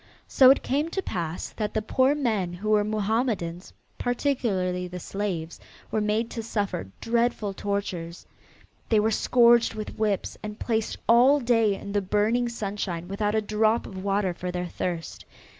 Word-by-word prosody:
So 260 -1 +6
it 270 - +5
came 290 +5 0
to 385 - -2
pass 170 - -4
that 210 -2 -4
the 215 - +1
poor 260 +5 +2
men 215 -11 -1
who 200 +5 -4
were 210 -1 +4
Mohammedans, 210 -4 -1 0.3
particularly 200 -9 0
the 180 0 -7
slaves, 175 -4 -4 0.3
were 215 - +1
made 215 +2 0
to 230 - -4
suffer 205 - -3
dreadful 230 -3 0
tortures. 190 -4 -4 0.6
They 220 - +4
were 220 +1 +2
scourged 235 +1 +4
with 215 0 -7
whips 210 -3 -1
and 210 -1 -6
placed 225 -2 -1
all 250 +5 +6
day 230 -5 +2
in 200 - -8
the 205 0 +1
burning 215 +5 +1
sunshine 200 -6 -4
without 205 +2 -1
a 220 - +2
drop 215 +2 +1
of 190 -1 -8
water 195 -2 0
for 180 +1 -5
their 180 0 -3
thirst. 175 -1 -4
210 Hz, 160 wpm, -26 LUFS, 185-230 Hz, 0.6 s, So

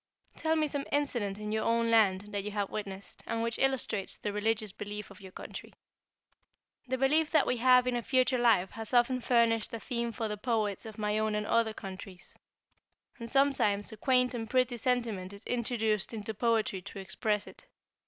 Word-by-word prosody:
"Tell 320 0 +1
me 310 -1 +2
some 285 0 -4
incident 240 -9 0
in 210 0 -5
your 220 0 0
own 230 0 +2
land 200 -4 +4
that 205 -1 -3
you 210 - -4
have 205 -1 -2
witnessed, 200 -2 -7
and 230 0 -1
which 230 0 -2
illustrates 260 -7 0
the 205 - -4
religious 215 0 0
belief 210 +1 -6
of 200 - -14
your 190 -1 -11
country." - - -9 1.1
"The 260 +1 -1
belief 300 +4 +3
that 315 - +4
we 250 - 0
have 250 +1 +5
in 250 -1 0
a 240 - 0
future 255 +1 +2
life 225 -6 +3
has 225 +2 -3
often 245 +1 +3
furnished 230 -3 +2
a - - -5
theme 235 0 -2
for 225 -1 -3
the 210 0 -4
poets 215 -2 -1
of 220 - -10
my 210 0 0
own 215 -1 0
and 210 0 -1
other 220 0 +1
countries. 190 -1 -9 0.8
And 230 0 -6
sometimes 265 -7 +2
a - - -8
quaint 250 +2 +2
and 225 -2 -4
pretty 255 -1 +2
sentiment 225 -6 -1
is 200 +2 -10
introduced 225 -3 0
into 220 0 -4
poetry 220 -3 0
to 200 - -10
express 210 +2 -1
it." - - -12
225 Hz, 195 wpm, -31 LUFS, 210-250 Hz, 1.1 s, have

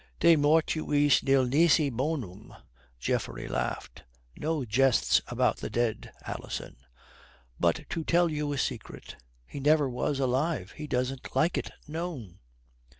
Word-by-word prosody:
"De 170 0 +6
mortuis 150 -1 +3
nil 135 -1 +3
nisi 150 +3 +4
bonum," 120 - -4 0.4
Geoffrey - - -2
laughed. - - -4 0.3
"No 155 -3 -2
jests 125 +3 +3
about - - +1
the - - -5
dead, 120 -2 -2
Alison. - - -6 0.8
But 85 - +1
to 165 - -2
tell 175 +2 +3
you 150 -1 -2
a 145 - -2
secret, 125 -4 -5 0.3
he 140 - -8
never 150 +1 +3
was 130 +2 -2
alive. 130 - 0
He 150 - -8
doesn't 125 0 -3
like 155 +6 +2
it - - -3 0.2
known." 150 - -6
140 Hz, 130 wpm, -28 LUFS, 125-155 Hz, 0.8 s, De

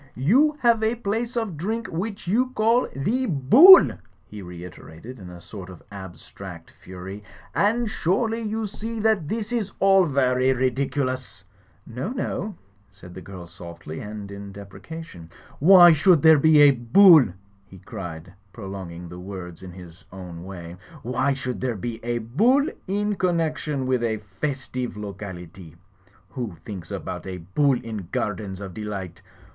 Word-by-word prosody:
''You 270 - +3
have 235 -3 +3
a 220 +2 +1
place 230 +2 -3
of 215 -9 -2
drink, 220 +8 -3
which 200 +4 -5
you 245 +7 +2
call 230 +3 +2
The 235 - -1
Bool," 230 - +8 0.3
he 105 - -10
reiterated 90 +5 -11
in 90 -2 -10
a 90 0 -11
sort 95 +1 -10
of 90 -3 -13
abstract 95 -2 -10
fury, 95 +3 -10 0.3
"and 230 +3 +1
surely 220 +4 -1
you 220 0 -3
see 220 +2 -6
that 215 -7 +1
this 220 +4 -4
is 220 -5 -2
all 195 -1 +5
vary 130 -2 +2
ridiculous 130 -2 -2 0.2
!" 100 +2 -35
"No, 125 - -5
no 215 -5 -4 0.2
!" 100 0 -36
said 90 -2 -14
the 95 - -9
girl, 95 -2 -10
softly, 85 -2 -10
and 105 -1 -8
in 100 0 -8
deprecation. 100 - -10 0.3
"Why 175 +1 +8
should 160 0 +4
there 160 -2 +7
be 155 0 +5
a 145 -1 +8
Bull?" 145 +5 +6 0.4
he 95 - -14
cried, 90 -3 -8 0.2
prolong 95 -2 -7
ing 85 +1 -9
the 90 +1 -10
word 90 -2 -8
in 95 -1 -9
his 85 -2 -13
own 90 -3 -9
way. 90 -2 -9 0.3
"Why 130 +3 0
should 125 -2 -5
there 125 -3 -1
be 115 +3 -6
a 120 0 -1
Bull 225 - +2 0.2
in 205 +1 -1
connection 155 -6 -1
with 130 -1 0
a 115 -2 -1 0.2
festive 130 -4 -3
locality? 95 -5 -9 0.5
Who 120 -9 -5
thinks 95 -6 -8
about - - -6
a 95 -1 -5
Bull 125 - +1
in 110 -6 -7
gardens 100 -1 -3
of 95 -2 -7
delight? 95 -4 -6
125 Hz, 155 wpm, -24 LUFS, -, 0.5 s, Bool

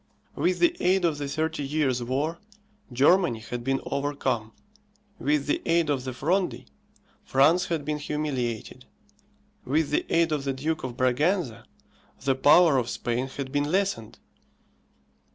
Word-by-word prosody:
With 180 0 +1
the 345 0 +3
aid 185 0 +2
of 155 -3 0
the 145 - -3
Thirty 160 +2 -2
Years' 140 -3 0
War, 140 +7 -2 0.5
Germany 145 +2 +3
had 120 +2 -6
been 135 +1 0
overcome; 135 -6 -2 0.7
with 145 -1 +1
the 145 - 0
aid 165 -2 +2
of 135 -2 -2
the 130 - -3
Fronde, 180 +9 -1 0.6
France 155 +7 +3
had 160 -4 -2
been 150 0 -2
humiliated; 130 -5 -3 0.8
with 145 +4 0
the - - +1
aid 165 -1 +2
of 150 -2 -1
the 135 -1 -1
Duke 155 +4 -3
of 125 -2 -5
Braganza, 130 - 0 0.5
the 135 0 +1
power 145 +2 +5
of 120 -1 -3
Spain 120 +2 -2
had 135 0 -6
been 145 0 +1
lessened. 190 - -1
145 Hz, 145 wpm, -26 LUFS, 130-160 Hz, 0.8 s, power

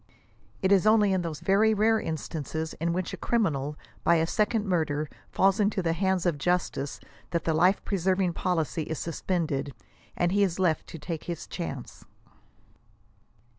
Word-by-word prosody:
It 190 - +3
is 200 +1 +5
only 215 -2 +5
*• - - +2
in 185 - +1
those 165 -3 -5
very 215 +3 +3
rare 220 +2 +3
instances 160 -1 -4
in 170 +1 +1
which 180 +1 -2
a - - -4
criminal, 150 - 0 0.3
by 170 - +5
a 165 0 +3
second 210 +4 +1
murder 155 -5 0 0.2
falls 195 +2 +3
into 205 -2 +1
the 165 -1 +1
hands 190 0 0
of 165 -5 +1
justice 175 -4 -1 0.3
that 170 -2 -1
the 165 - +1
life 180 +5 +3
preserving 185 -2 +1
policy 165 -2 -1
is 160 0 -4
suspended, 160 -5 -2 0.4
and 175 0 +2
he 200 +1 +2
is 185 -4 +2
lef\ 180 -4 +1
to - - -8
take 160 +1 -5
his 170 -2 -5
chance." 140 -8 -6
175 Hz, 170 wpm, -27 LUFS, 160-195 Hz, 0.4 s, is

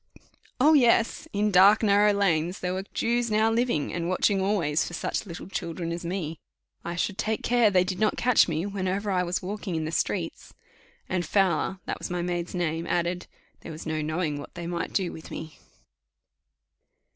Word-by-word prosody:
Oh, 300 +5 +6
yes! 235 -5 +3
In 210 +1 +1
dark 200 +4 +6
narrow 205 0 +5
lanes 180 -3 +1
there 180 0 -1
were 190 +1 -4
Jews 235 0 0
now 220 +1 +3
living, 230 - 0
and 170 0 -2
watching 190 +2 +2
always 170 -6 +1
for 175 - -5
such 205 - -3
little 170 -1 -7
children 170 -2 -4
as 170 +1 -4
me; 170 -3 -4 0.4
I 170 - -4
should 195 +3 -2
take 220 0 -1
care 240 -3 +4
they 185 -2 +4
did 185 0 -4
not 215 -1 +1
catch 250 -2 +4
me, 165 +1 -1
whenever 200 0 -2
I 185 -1 +2
was 180 0 -2
walking 195 -1 -4
in 160 -1 -1
the 160 - -3
streets; 165 0 -3 0.5
and 180 -1 -1
Fowler 190 -1 +1
(that - - -4
was - - -5
my 175 -1 -2
maid's 175 0 -3
name) 165 -1 -1
added, 175 +1 -1 0.3
"There - - -9
was 155 +1 -8
no 155 -1 -2
knowing 155 -1 -2
what 145 - -10
they 175 -1 -6
might 170 0 -3
do 185 -3 0
with 160 - -10
me." 155 -1 -8
185 Hz, 190 wpm, -26 LUFS, 170-205 Hz, 0.5 s, Oh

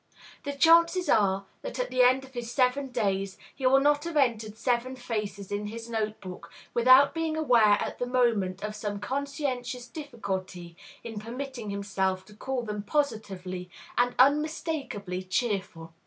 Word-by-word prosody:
The 285 - -2
chances 335 +4 +5
are 195 -2 +3 0.2
that - - -6
at - - -2
the 255 - +3
end 255 +2 +5
of 265 0 -14
his 240 -1 -5
seven 260 +2 +2
days 195 -6 -1 0.2
he 265 -2 0
will 270 +1 +6
not 290 +1 +3
have 335 -2 -3
entered 225 -6 +1
seven 245 +2 0
faces 210 -5 -4
in 205 +1 -2
his 230 +2 -7
note 215 -1 -2
book 180 -3 -9 0.2
without 255 +4 +6
being 325 -1 -1
aware 235 -9 +5
at - - -4
the 245 - -1
moment 220 -7 +1
of 210 0 -4
some 205 -1 -4
conscientious 255 -1 -3
difficulty 195 - -6 0.3
in 225 -3 -6
permitting 240 0 -6
himself 195 -2 -1
to 210 - -15
call 255 +3 -3
them 210 -2 -4
positively 195 -8 -2 0.3
and 245 0 +2
unmistakably 280 - +1
cheerful. 185 -5 -2
235 Hz, 155 wpm, -28 LUFS, 200-270 Hz, 0.3 s, will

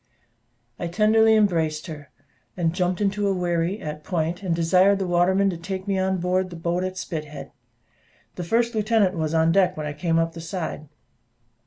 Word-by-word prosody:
I 175 - -2
tenderly 220 +4 +4
embraced 165 -7 +1
her, 150 -3 -9 0.6
jumped 180 +2 -1
into 205 0 0
a 195 - +1
wherry, 175 +2 -1
at 150 0 -6
Point, 170 +2 -2
and 180 -4 -1
desired 185 +4 +4
the 195 - -2
waterman 185 +3 +2
to 175 - -5
take 190 +3 -6
me 195 -1 0
on 190 0 0
board 185 +1 0
the 170 -1 -5
I, 185 - -1
at 185 0 -8
Spithead. 150 -5 -6 0.8
The 180 - -6
first 235 +6 +1
lieutenant 215 -3 +2
was 160 -1 -1
on 160 0 +3
deck 185 0 +2
when 155 - -4
I 145 - -4
came 165 +2 0
up 165 0 0
the 165 - -8
side. 160 -3 -5
180 Hz, 180 wpm, -24 LUFS, 165-195 Hz, 0.8 s, tenderly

